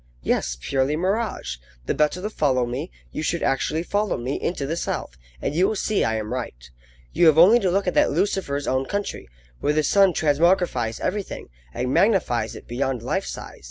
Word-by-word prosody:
Yes, 60 0 0
purely 135 - 0
mirage! 185 - -1 0.3
The - - 0
better 150 +4 +1
to 210 - -1
follow 130 - +1
me, 130 +8 -4 0.2
you - - -4
should 170 +2 -1
actually 155 +4 0
follow 205 +3 0
me 125 +3 -3
into 155 -5 -2
the 155 +4 -2
South, 65 - -3 0.3
and - - -1
you 180 +5 +3
will 220 - -1
see 210 +1 0
I 110 - +1
am 110 +1 -3
right. 65 - -6 0.4
You 170 - +5
have 155 -1 +5
only 195 +9 +8
to 190 - +1
look 195 +2 +1
at 180 - 0
that - - +4
Lucifer's 155 -4 -1
own 130 +1 0
country, 200 - -4 0.3
where 150 - +1
the 155 0 +2
sun 195 +2 +4
transmogrifies 150 -6 +2
everything, 200 - -3 0.2
and 125 - -2
magnifies 130 - +2
it - - -11
beyond 125 -1 -2
life 190 +10 -1
size. - - -8
150 Hz, 195 wpm, -23 LUFS, 125-190 Hz, 0.4 s, only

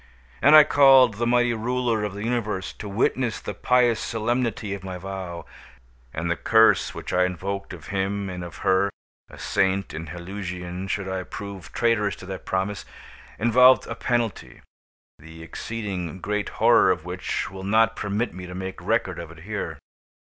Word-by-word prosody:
And 150 +3 +7
I 155 - +11
called 135 -5 +6
the 120 +1 0
Mighty 120 0 +3
Ruler 120 -1 -1
of 105 -2 -3
the 100 - -5
Universe 105 -5 -2
to 105 - -8
witness 115 +3 0
the - - -6
pious 120 +2 +2
solemnity 115 -2 -1
of 100 -1 -7
my 95 -1 -5
vow. 90 -2 -6 0.7
And 80 +5 -3
the - - +1
curse 110 +4 +4
which - - -6
I 90 - +4
invoked 100 +2 -3
of 80 -3 -10
Him 100 0 -1
and 90 -1 -5
of 85 -1 -9
her, 95 +1 +3 0.4
a - - -13
saint 95 +1 0
in 80 +1 -6
Helusion 90 +1 -6
should 95 0 -2
I 95 0 -2
prove 95 -3 -8
traitorous 110 -4 +1
to - - -12
that 95 0 -8
promise, 95 +1 -2 0.5
involved 125 +4 +5
a - - -5
penalty 120 -3 -2 0.6
the 80 +1 -12
exceeding 95 -2 -5
great 105 +2 -2
horror - - +5
of - - 0
which - - -3
will 95 -1 -8
not 110 +3 +3
permit 105 +2 -2
me 90 +1 -8
to 90 - -8
make 95 0 -6
record - - 0
of 85 -2 -7
it 85 -1 -13
here. 105 +1 -4
100 Hz, 170 wpm, -24 LUFS, 95-115 Hz, 0.7 s, I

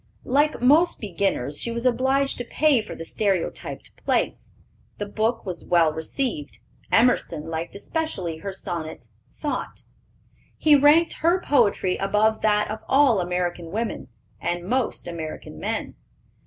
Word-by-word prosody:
Like 290 +3 +2
most 310 +7 +5
beginners, 180 - -1
she - - -1
was 235 +1 -4
obliged 265 +2 +1
to - - -2
pay 285 0 +2
for 215 - -8
the 165 - -7
stereotyped 195 -2 -2
plates. - - -1 0.5
The 205 - -3
book 220 +3 -1
was 185 -3 -5
well 170 -3 +3
received. 160 - -3 0.3
Emerson 195 -10 +2
liked 165 +3 -4
especially 200 - -3
her 195 +5 -5
sonnet, 165 -7 -6 0.3
Thought. 295 - -4 0.7
He 305 -2 +5
ranked 295 +4 +5
her 340 +3 +3
poetry 200 - +2
above 210 +3 +1
that 210 -1 +2
of 215 - -4
all 270 -6 +5
American 175 -1 -2
women, 220 +5 -3 0.3
and 175 +1 -2
most 250 0 -1
American 165 -2 -7
men. - - -3
210 Hz, 135 wpm, -24 LUFS, 175-265 Hz, 0.7 s, most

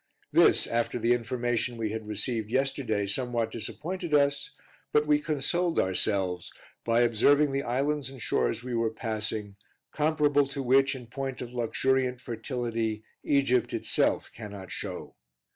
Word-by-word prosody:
This, - - +5
after 120 +1 -1
the 120 +1 +3
information 120 0 -1
we 110 -2 -2
had 110 -1 -5
received 110 +1 -1
yesterday, 130 -5 0
somewhat 115 +2 -1
disappointed 165 +8 -3
us, 140 0 +2 0.4
but 150 0 +3
we 150 0 +4
consoled 160 +3 0
ourselves 95 -1 0 0.3
by 115 +1 +3
observing 140 +5 +4
the 135 0 0
islands 140 +2 -1
and 135 -1 -11
shores 115 +1 0
we 125 -1 -5
were 115 -1 +1
passing, 110 -2 -3 0.3
comparable 150 -2 +2
to 140 0 -4
which, 135 +2 +4
in 125 -2 -8
point 135 +2 -5
of 125 0 -7
luxuriant 125 +1 +1
fertility, 115 -2 -3 0.2
Egypt 125 -4 +2
itself - - +1
cannot 100 -5 -9
show. - - -6
120 Hz, 140 wpm, -28 LUFS, 110-140 Hz, 0.4 s, This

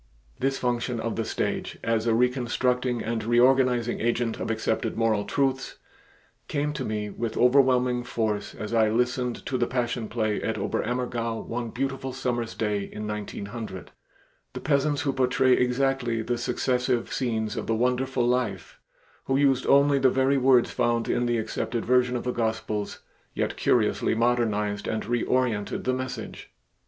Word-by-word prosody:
This 135 +1 0
function 120 -1 -1
of 115 0 -2
the 115 - -1
stage, 110 - -3
as 115 0 0
a 115 - +3
reconstructing 125 0 +1
and 115 0 -2
reorganizing 120 0 +3
agent 120 0 0
of - - -3
accepted 110 0 -1
moral 110 -3 +1
truths, 135 +4 -1 0.7
came 150 0 -1
to - - -4
me 105 -1 -3
with 115 +2 -4
overwhelming 125 -1 +4
force 105 -3 -2
as 105 +2 -5
I 110 -2 +4
listened 125 +1 -1
to 130 - -2
the 120 - +1
Passion 120 -2 -2
Play 110 -2 -1
at 110 0 -2
Oberammergau 115 +2 -2
one 120 0 -4
beautiful 135 +1 -3
summer's 120 -3 -2
day 105 -2 0
in 105 +2 -6
1900. 105 -1 -6 0.6
The - - -5
peasants 145 0 +1
who 140 -2 0
portrayed 130 0 +3
exactly 125 -2 +1
the 120 +1 -2
successive 125 0 0
scenes 110 -4 -1
of - - -4
the 115 - +1
wonderful 125 +1 +1
Life, 120 -8 -1 0.5
who 135 - +1
used 135 -2 +2
only 140 0 +5
the 130 -1 +5
very 135 +2 +2
words 130 -2 +4
found 120 -1 0
in 120 - +1
the 120 0 +1
accepted 115 +1 -3
version 125 0 +3
of 120 - -2
the 125 - -1
Gospels, 110 -3 -2 0.3
yet - - -1
curiously - - +2
modernized 110 -3 0
and 110 - -2
reorientated 120 -2 0
the 130 - +1
message. 130 0 -6
120 Hz, 155 wpm, -26 LUFS, 110-130 Hz, 0.7 s, only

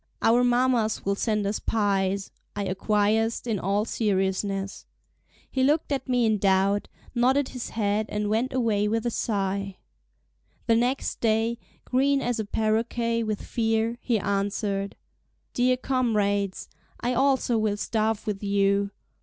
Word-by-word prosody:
"Our 240 +2 +5
mammas 245 -3 +2
will 200 - +2
send 210 0 0
us 205 +2 -1
pies," 195 -2 0 0.2
I 205 -1 -2
acquiesced 210 +4 +1
in 220 -5 -1
all 200 +4 0
seriousness. 195 -2 -1 0.6
He 260 - -1
looked 300 +3 +2
at 270 -2 -2
me 245 -2 +3
in 215 -2 +2
doubt, 195 +1 +2 0.3
nodded 260 +3 +2
his 250 -3 -6
head 215 0 0
and 210 0 -2
went 225 +5 0
away 225 -5 +1
with 225 +2 -1
a 240 - 0
sigh. 195 -3 -2 0.9
The 230 - +4
next 245 +4 0
day, 225 +1 +1 0.3
green 275 +2 +2
as 245 -3 -1
a 215 - -1
paroquet 230 +2 0
with 215 -2 -3
fear, 225 0 0
he 235 -3 +1
answered: 200 0 -1 0.6
"Dear 250 +1 +2
comrades! 210 -7 0 0.3
I 245 +1 -1
also 265 -2 +2
will 215 -1 0
starve 220 0 -1
with 205 -2 -3
you." 200 0 +2
220 Hz, 140 wpm, -26 LUFS, 200-240 Hz, 0.9 s, Our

